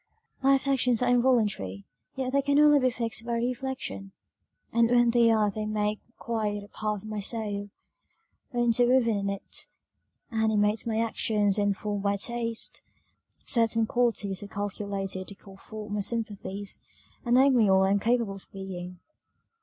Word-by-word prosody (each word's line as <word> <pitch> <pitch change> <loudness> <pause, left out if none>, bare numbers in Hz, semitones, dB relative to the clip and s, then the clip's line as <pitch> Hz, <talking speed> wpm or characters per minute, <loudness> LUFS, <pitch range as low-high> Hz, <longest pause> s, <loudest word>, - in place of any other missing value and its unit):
"My 275 +1 +5
affections 260 -3 +1
are 245 - +2
involuntary 215 - +1 0.3
yet 260 -1 -3
they 280 - +3
can 285 +1 +1
only 295 -1 +6
be 255 -1 +3
fixed 230 -2 -3
by 235 0 -3
reflection, 240 - -3 0.6
and 230 0 +4
when 240 -1 +4
they 235 -1 +4
are 215 -2 +3
they 215 +1 -4
make 210 0 -1 0.2
quite 215 -3 -2
a - - -12
part 210 -1 -4
of - - -9
my 215 -1 -4
soul, 205 -1 -3 0.8
are 245 - -2
interwoven 240 0 +3
in 200 0 -1
it, 200 0 -3 0.6
animate 220 -1 +1
my 220 -1 -1
actions, 210 -3 +1
and 205 -1 +1
form 205 -1 -3
my 200 0 +1
taste: 230 +1 -1 0.6
certain 230 -2 +2
qualities 220 -5 0
are 205 - -7
calculated 200 -2 -4
to 200 - -9
call 195 -1 -15
forth 210 +1 -9
my 210 - -1
sympathies, 205 -2 -3 0.4
and 240 0 +2
make 265 +1 +5
me 225 -5 +4
all 190 0 +5
I 190 - +2
am 200 - +3
capable 230 -1 +1
of 195 - -12
being. 180 -2 -7
215 Hz, 160 wpm, -27 LUFS, 200-240 Hz, 0.8 s, only